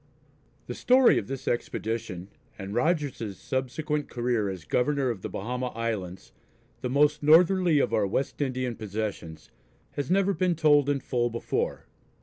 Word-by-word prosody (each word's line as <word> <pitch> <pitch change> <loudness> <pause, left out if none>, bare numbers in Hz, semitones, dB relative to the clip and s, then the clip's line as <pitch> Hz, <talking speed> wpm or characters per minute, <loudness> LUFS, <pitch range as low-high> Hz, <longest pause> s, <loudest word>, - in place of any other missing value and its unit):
The - - -5
story 255 0 +4
of - - -7
this 135 -1 -6
expedition, 110 -5 -3 0.3
and 95 0 -6
Rogers's 135 - -1
subsequent 145 - -3
career 120 -4 -1
as 95 -4 -7
Governor 135 0 +1
of 105 -5 -7
the - - -5
Bahama 125 +5 -3
Islands, 100 - -4 0.5
the 125 - -2
most 145 +3 +3
northerly 170 +2 +5
of 140 - +1
our 105 -2 +2
West 135 +9 -2
Indian 130 -3 -2
possessions, 100 -7 -5 0.4
has 140 -2 -4
never 195 +1 +3
been 180 -2 +1
told 145 -3 +4
in 140 -2 0
full 120 -2 0
before. 115 0 -3
125 Hz, 145 wpm, -27 LUFS, 110-150 Hz, 0.5 s, northerly